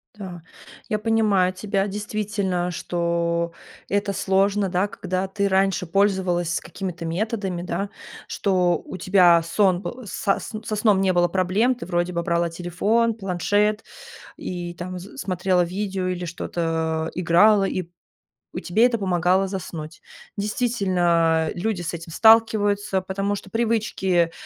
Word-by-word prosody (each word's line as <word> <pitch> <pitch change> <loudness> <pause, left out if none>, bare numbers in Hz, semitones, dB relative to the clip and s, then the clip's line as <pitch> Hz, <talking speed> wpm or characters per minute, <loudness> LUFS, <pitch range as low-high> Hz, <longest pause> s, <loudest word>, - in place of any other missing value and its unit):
Да, 185 -5 -8 0.5
я 215 -2 0
понимаю 210 -5 +2
тебя. 200 0 -1
Действительно, 200 -3 -2
что 170 -1 -1 0.4
это 200 0 0
сложно, 195 +1 +1
да, 185 +3 +1
когда 185 -1 -3
ты 200 +1 -1
раньше 190 -2 +1
пользовалась 185 -3 +1
какими-то 180 -3 -6
методами, 190 0 -2
да, 190 +3 -3 0.4
что 180 -4 +1
у 185 - -7
тебя 180 -2 +5
сон 185 +2 +2
был 250 +1 -7
со 195 +1 -1
с - - -8
со 215 - -3
сном 210 -2 +3
не 190 -1 +2
было 175 0 +3
проблем. 190 +8 +1
Ты 245 - -9
вроде 175 0 -1
бы 170 - -1
брала 170 0 0
телефон, 205 +7 0
планшет 205 +2 0 0.5
и, 175 -1 -5
там, 180 +1 -6
с 200 +9 -12
смотрела 185 -4 +1
видео 190 +1 -3
или 180 -1 -3
что-то 165 -1 -2
играла, 190 +4 +5
и 185 -1 -1
п 170 - -21 0.7
и - - -3
тебе 215 +7 +3
это 240 -2 +2
помогало 185 0 +2
заснуть. 160 -4 -6 0.4
Действительно, 180 -8 +1
люди 190 0 -2
с 175 +1 -4
этим 165 -1 -7
сталкиваются, 210 -3 +4
потому 195 +2 -2
что 195 - -9
привычки 205 -6 +1
190 Hz, 140 wpm, -23 LUFS, 175-205 Hz, 0.7 s, тебя